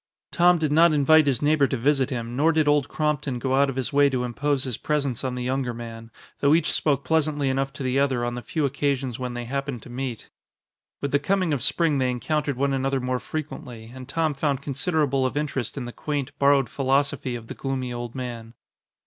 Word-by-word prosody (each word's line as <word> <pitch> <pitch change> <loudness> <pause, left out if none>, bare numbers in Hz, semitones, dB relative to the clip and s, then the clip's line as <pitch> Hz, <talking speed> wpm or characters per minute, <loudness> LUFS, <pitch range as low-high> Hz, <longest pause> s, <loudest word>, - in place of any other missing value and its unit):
Tom 175 0 +5
did 155 -2 0
not 165 +2 +5
invite 150 +1 +5
his 135 -1 +1
neighbor 145 -1 +4
to 130 - -2
visit 135 +2 +2
him, 120 -2 -4
nor 155 +5 +4
did 155 -2 +2
Old 145 -2 +3
Crompton 150 -4 -1
go 130 +2 -1
out 140 +1 +4
of 135 - -4
his 130 0 -3
way 145 0 +5
to 130 -2 -1
impose 135 +3 -1
his 130 -4 -3
presence 140 -5 -1
on 130 -1 -2
the 125 - -3
younger 125 -1 -1
man, 115 -1 -8 0.3
though 145 +2 +4
each 165 -1 +1
spoke 140 -3 +1
pleasantly 150 -3 +1
enough 135 +1 0
to - - -6
the 130 +1 +1
other 130 -4 +1
on 120 - -2
the 120 - -5
few 150 +5 -1
occasions 135 -3 -1
when 125 -1 -4
they 120 0 -4
happened 135 -2 -4
to 125 - -11
meet. 125 -2 -5 0.7
With 140 - -2
the 140 - +3
coming 185 +1 +1
of 135 - -1
spring 150 +2 +1
they 130 -1 +1
encountered 145 +2 -1
one 140 +1 +1
another 135 0 0
more 125 0 -1
frequently, 125 -7 -7
and 130 0 -10
Tom 160 +1 0
found 140 -1 -1
considerable 140 -1 0
of 130 +2 -1
interest 145 -4 -2
in 130 - -3
the 120 - -7
quaint, 145 -2 -3
borrowed 140 -2 +4
philosophy 135 0 0
of 115 -1 -7
the - - -7
gloomy 130 -2 -3
old 120 0 -6
man. 120 -3 -6
135 Hz, 220 wpm, -25 LUFS, 125-145 Hz, 0.7 s, Tom